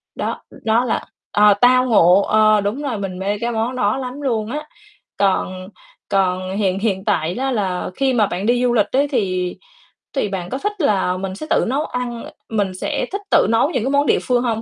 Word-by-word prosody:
Đó, - - -3 0.2
đó 230 +3 +3
là 225 - -1 0.3
ờ, 210 0 +6
Tao 255 +1 +5
Ngộ. 195 -5 +5
Ờ, 215 0 +4
đúng 210 +8 -2
rồi, 255 -6 -2
mình 185 -2 -5
mê 200 +2 -2
cái 235 0 -1
món 230 +3 -2
đó 210 0 +1
lắm 260 +2 -6
luôn 230 -4 -1
á. 300 +1 -5 0.5
Còn 185 -1 0 0.4
còn 185 0 0
hiện 195 -2 0
hiện 195 -3 -1
tại 175 -5 0
đó 265 +1 -1
là 190 -6 -1
khi 270 -1 +1
mà 215 -4 +3
bạn 190 +3 -4
đi 245 +1 +2
du 245 -1 +2
lịch 210 -3 +3
ấy, 280 +2 +2
thì 185 -9 -1 0.6
thì 210 -7 0
bạn 180 -2 -4
có 260 - -3
thích 415 +3 -3
là 190 -7 +1
mình 190 0 -4
sẽ 310 - -7
tự - - +3
nấu 280 +5 0
ăn 240 -2 -4 0.3
mình 205 -4 -1
sẽ - - -2
thích 400 +1 -3
tự - - +5
nấu 230 +6 +3
những 250 -9 -1
cái 270 - -1
món 285 +1 +3
địa - - +3
phương 250 -1 +1
hông? 225 -2 -1
220 Hz, 220 wpm, -19 LUFS, 195-255 Hz, 0.6 s, ờ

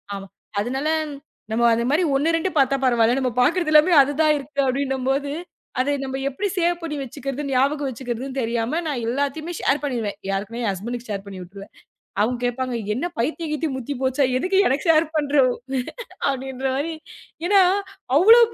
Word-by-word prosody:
ஆனா 195 0 -7 0.3
அதனால 265 +7 -1 0.6
நம்ம 235 +1 +2
அந்த 235 +1 -1
மாதிரி 335 +4 +3
1 325 +4 +2
2 370 +3 -1
பாத்தா 275 0 +3
பரவாயில்ல. 240 +1 +3
நம்ம 255 -2 0
பாக்குறது 340 +2 +1
எல்லாமே 310 +4 +6
அது 285 +2 -2
தான் 305 -1 +4
இருக்கு 280 +1 -2
அப்படின்னு 270 +1 0
போது, 280 +1 -1 0.5
அத 260 - +1
நம்ம 265 0 -3
எப்படி 390 +10 -2
சேவ் 350 0 +2
பண்ணி 320 -3 -4
வச்சுக்குறதுன்னு, 275 +1 -4
ஞாபகம் 280 +2 +2
வச்சுக்குறதுன்னு 255 +2 -5
தெரியாம 235 +7 -1
நான் 260 -6 -2
எல்லாத்தையும் 285 +6 -2
ஷேர் 275 +2 +2
பண்ணிடுவேன். 230 -8 -2
யாருக்குமே 210 +5 -3
ஹஸ்பண்ட்க்கு 235 +6 -5
ஷேர் 200 -1 -3
பண்ணி 195 -1 -8
விட்டுருவேன். 195 +3 -11 0.5
அவங்க 240 +3 +1
கேப்பாங்க. 250 0 -2 0.2
என்ன 265 +10 -2
பைத்தியம் 310 +6 -1
கியித்தியம் 305 -2 -1
முத்தி 260 +3 -4
போச்சா. 260 +1 +2
எதுக்கு 370 +7 +1
எனக்கு 280 +6 0
ஷேர் 320 0 +5
பண்ற 295 -1 0 0.9
அப்படின்ற 265 0 -4
மாரி 320 +4 -2 0.5
ஏன்னா 395 +1 +6 0.6
அவ்ளோ 450 +8 +8
270 Hz, 160 wpm, -23 LUFS, 240-300 Hz, 0.9 s, அவ்ளோ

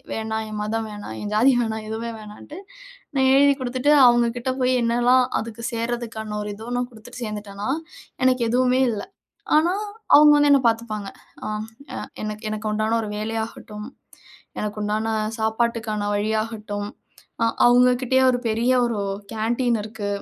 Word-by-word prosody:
வேணாம், 220 0 -2
என் 215 - -5
மதம் 220 +1 -2
வேணாம், 205 - -7
என் 210 0 -4
ஜாதி 250 +5 +5
வேணாம், 220 -1 -3
எதுவுமே 230 +1 -4
வேணான்ட்டு 215 - -11 0.6
நான் 265 0 +4
எழுதி 280 0 +6
குடுத்துட்டு, 255 +3 0 0.2
அவங்க 240 -1 +4
கிட்ட 245 +2 -2
போய் 255 0 +3
என்னலாம் 245 +2 +4 0.2
அதுக்கு 230 0 -7
சேர்றதுக்கான 230 -2 -3
ஒரு 210 - -5
இதுன்னு 245 +3 -3
குடுத்துட்டு 230 +2 -11
சேர்ந்துட்டேனா, 210 0 -5 0.6
எனக்கு 255 -2 +3
எதுவுமே 255 +1 +3
இல்லை. 205 - -5 0.5
ஆனா, 340 +4 +3 0.4
அவங்க 300 0 +8
வந்து 290 0 +4
என்னை 275 -2 +5
பார்த்துப்பாங்க. 220 -3 -2 0.4
அம் 215 +1 -3 0.3
எ - - -3 0.3
எனக்கு 215 +1 -5
எனக்கு 215 0 -3
உண்டான 215 +2 +1
ஒரு 210 - -5
வேலையாகட்டும், 220 -1 -5 0.7
எனக்கு 210 0 -4
உண்டான 215 +2 -1 0.3
சாப்பாட்டுக்கான 220 -1 -1
வழியாகட்டும் 210 -1 -2 0.5
அ - - +5 0.2
அவங்ககிட்டயே 250 +1 +4
ஒரு 245 - 0
பெரிய 230 +3 +2
ஒரு 225 -3 -2 0.3
கேன்டீன் 235 +1 0
இருக்கு. 210 -1 -5
225 Hz, 140 wpm, -23 LUFS, 215-245 Hz, 0.7 s, அவங்க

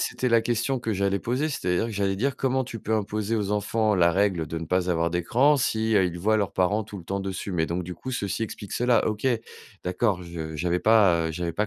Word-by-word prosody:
c'était 130 - -1
la 115 -1 +4
question 120 +3 0
que 115 -2 -2
j'allais 100 0 +1
poser, 130 +9 -1
c'est-à-dire 90 - -1
que 115 - -5
j'allais 100 -1 0
dire: 130 +7 -1
«Comment 130 0 +1
tu 120 -2 -7
peux 110 +2 -1
imposer 105 +1 -1
aux 105 -2 -1
enfants 105 +1 +1
la 85 -1 +4
règle 95 -4 +1
de 80 +3 -4
ne 80 - -5
pas 90 +2 0
avoir 85 -1 +1
d'écran 120 - +3
si, 110 -3 0
heu, 95 - +4
ils 85 0 -5
voient 110 +3 +3
leurs 100 -3 -1
parents 100 +4 +1
tout 100 - -9
le 85 - -11
temps 100 +2 -2
dessus?» 95 0 -4
Mais 80 -2 +1
donc, 85 +2 -2
du 90 +1 -6
coup, 130 +8 -6
ceci 100 -1 -2
explique 105 -2 -9
cela. 120 -1 +2
OK, 110 +4 -3 0.6
d'accord, 90 +1 0
je 80 -2 -6
j'avais 90 +3 0
pas, 95 -7 +4
heu, 80 - -3
j'avais 85 0 -3
pas 105 +5 0
100 Hz, 245 wpm, -25 LUFS, 90-115 Hz, 0.6 s, la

